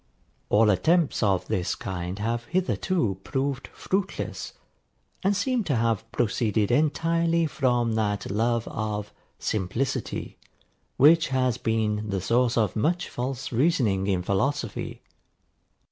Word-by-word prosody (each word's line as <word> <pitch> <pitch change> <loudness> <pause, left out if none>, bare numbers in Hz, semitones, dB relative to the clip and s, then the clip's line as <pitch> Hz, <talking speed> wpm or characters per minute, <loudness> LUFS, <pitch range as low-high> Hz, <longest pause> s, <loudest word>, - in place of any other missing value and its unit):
All 105 0 +5
attempts 160 - +2
of 95 -5 +2
this 90 0 -1
kind 90 0 -5
have 115 +3 -2
hitherto 175 - 0
proved 135 0 -2
fruitless, 195 +1 -3 0.7
and 200 +1 +2
seem 250 +2 0
to 145 - +1
have 115 -1 0
proceeded 110 -2 +1
entirely 165 +2 +2
from 120 -6 +1
that 105 -3 -1
love 115 +2 0
of 105 -1 -4 0.2
SIMPLICITY 110 +6 -2 0.6
which 160 +4 +6
has 130 -2 0
been 110 -1 0
the 100 -1 -1
source 120 +5 +2
of 110 -4 +1
much 175 +11 0
false 130 +1 -4
reasoning 115 - +2
in 95 -3 +1
philosophy. 110 +4 -2
115 Hz, 115 wpm, -26 LUFS, 105-145 Hz, 0.7 s, which